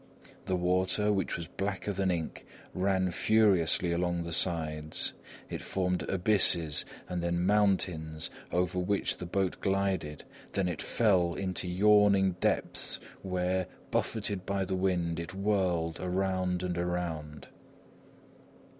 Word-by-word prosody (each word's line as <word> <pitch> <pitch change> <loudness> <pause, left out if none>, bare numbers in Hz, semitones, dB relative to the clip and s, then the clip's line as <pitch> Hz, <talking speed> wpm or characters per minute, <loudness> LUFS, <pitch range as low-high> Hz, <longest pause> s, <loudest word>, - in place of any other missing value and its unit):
The 95 - 0
water, 95 +4 +2
which 95 - -1
was 85 -2 -6
blacker 100 +2 -3
than 95 0 0
ink, 85 -3 -3 0.3
ran 95 -1 +1
furiously 95 -4 +3
along 85 0 0
the 85 - -6
sides. 80 -3 0 0.3
It - - -5
formed 90 -3 -2
abysses 90 -5 +3 0.2
and 90 -1 -3
then 85 +1 0
mountains, 90 -6 +1 0.2
over 90 0 0
which 100 +3 -1
the 90 - -6
boat 95 +1 -1
glided, 95 -6 -1 0.3
then 95 -2 0
it 85 -3 -3
fell 95 -7 +2
into 95 -1 -1
yawning 100 +1 +4
depths - - 0 0.2
where, 90 0 -1 0.2
buffeted 100 -4 -1
by 100 0 -1
the 95 - -3
wind, 90 -3 0
it 85 +3 -6
whirled 95 -5 0
around 90 0 -1
and 90 -1 -2
around. 85 -4 -4
90 Hz, 125 wpm, -30 LUFS, 85-95 Hz, 0.3 s, yawning